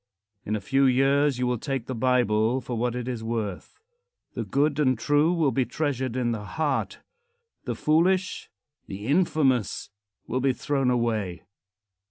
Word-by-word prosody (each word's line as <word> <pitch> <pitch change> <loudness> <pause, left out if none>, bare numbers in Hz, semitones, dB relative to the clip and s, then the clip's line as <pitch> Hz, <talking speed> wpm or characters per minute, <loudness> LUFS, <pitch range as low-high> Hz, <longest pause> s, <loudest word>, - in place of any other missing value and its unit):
In 105 - 0
a 105 - -3
few 135 +7 +2
years 135 +2 +3
you 125 - 0
will 125 -2 0
take 135 -3 -3
the 130 - -4
Bible 120 -1 +2
for 120 -1 -5
what 120 +1 -1
it 125 0 -4
is 120 -3 -4
worth. 110 -5 -4 0.5
The - - -3
good 145 +1 0
and 130 -4 +3
true 145 +7 +2
will 165 -6 +2
be 130 +2 +1
treasured 130 -3 -2
in 125 -2 0
the 110 -3 -3
heart; 145 +5 -2 0.6
the - - -2
foolish, 180 +5 +1 0.4
the 100 +1 -7
infamous, 140 - +1 0.3
will 130 +2 -2
be 135 0 +2
thrown 135 -1 0
away. 110 -7 -1
130 Hz, 160 wpm, -26 LUFS, 115-145 Hz, 0.6 s, years